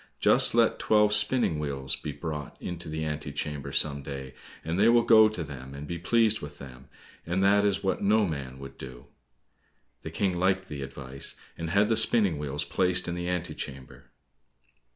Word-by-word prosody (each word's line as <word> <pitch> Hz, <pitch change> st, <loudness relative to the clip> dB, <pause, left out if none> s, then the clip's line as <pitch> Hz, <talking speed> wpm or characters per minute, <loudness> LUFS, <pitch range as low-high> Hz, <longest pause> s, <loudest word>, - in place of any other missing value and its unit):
Just -, -, +4 dB
let -, -, +3 dB
twelve 105 Hz, -1 st, +3 dB
spinning 105 Hz, -5 st, +3 dB
wheels 70 Hz, -3 st, -2 dB
be -, -, -6 dB
brought 75 Hz, -3 st, -6 dB
into 85 Hz, -2 st, -6 dB
the 80 Hz, 0 st, -3 dB
ante 75 Hz, -1 st, -4 dB
chamber 70 Hz, -1 st, -5 dB
some 70 Hz, 0 st, +1 dB
day, 65 Hz, -1 st, -7 dB, 0.3 s
and 80 Hz, +3 st, -2 dB
they 110 Hz, +3 st, +5 dB
will 120 Hz, 0 st, +5 dB
go 110 Hz, -2 st, +6 dB
to 105 Hz, -6 st, -4 dB
them 70 Hz, -2 st, -9 dB
and 70 Hz, +1 st, -7 dB
be 85 Hz, +2 st, -5 dB
pleased 110 Hz, +3 st, +2 dB
with 75 Hz, 0 st, -9 dB
them, 65 Hz, -1 st, -12 dB, 0.3 s
and 90 Hz, +3 st, -1 dB
that 100 Hz, +1 st, +4 dB
is 100 Hz, -1 st, 0 dB
what 95 Hz, -, -1 dB
no 105 Hz, +1 st, +3 dB
man 70 Hz, -6 st, -5 dB
would 70 Hz, 0 st, -11 dB
do." 65 Hz, -2 st, -10 dB, 1.0 s
The -, -, -7 dB
King 95 Hz, -3 st, -1 dB
liked 95 Hz, +1 st, 0 dB
the 70 Hz, -2 st, -6 dB
advice, 70 Hz, 0 st, -5 dB, 0.2 s
and 80 Hz, -1 st, -5 dB
had 100 Hz, +4 st, +3 dB
the 115 Hz, -, +2 dB
spinning 110 Hz, -7 st, +4 dB
wheels 75 Hz, 0 st, -3 dB
placed 90 Hz, +4 st, +1 dB
in 85 Hz, -, -2 dB
the 90 Hz, 0 st, -4 dB
ante 90 Hz, -1 st, -2 dB
chamber. 65 Hz, -2 st, -9 dB
80 Hz, 190 wpm, -27 LUFS, 70-100 Hz, 1.0 s, go